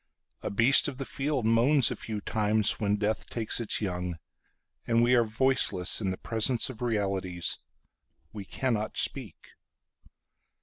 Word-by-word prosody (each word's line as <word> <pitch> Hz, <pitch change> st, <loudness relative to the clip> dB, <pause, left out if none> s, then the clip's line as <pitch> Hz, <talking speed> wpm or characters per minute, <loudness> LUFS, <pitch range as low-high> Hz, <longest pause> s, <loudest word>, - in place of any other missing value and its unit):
A -, -, -4 dB
beast 115 Hz, +7 st, +4 dB
of 140 Hz, -3 st, -6 dB
the 135 Hz, -, -5 dB
field 135 Hz, -3 st, -2 dB
moans 120 Hz, +4 st, +3 dB
a -, -, -3 dB
few 105 Hz, -2 st, -6 dB
timesWhen 105 Hz, -1 st, +1 dB
death 105 Hz, +1 st, -2 dB
takes 115 Hz, -1 st, -1 dB
its 115 Hz, -2 st, 0 dB
young. 90 Hz, -3 st, -3 dB, 0.7 s
And 115 Hz, 0 st, +3 dB
we 120 Hz, +1 st, +3 dB
are 120 Hz, -1 st, +5 dB
voiceless 110 Hz, -5 st, +2 dB
in 100 Hz, -, -1 dB
the 95 Hz, -, -3 dB
presence 115 Hz, +3 st, 0 dB
of 115 Hz, -, -14 dB
realities—We 100 Hz, -1 st, -5 dB
cannot 110 Hz, -1 st, -3 dB
speak. 120 Hz, -, -2 dB
110 Hz, 135 wpm, -28 LUFS, 100-125 Hz, 0.7 s, are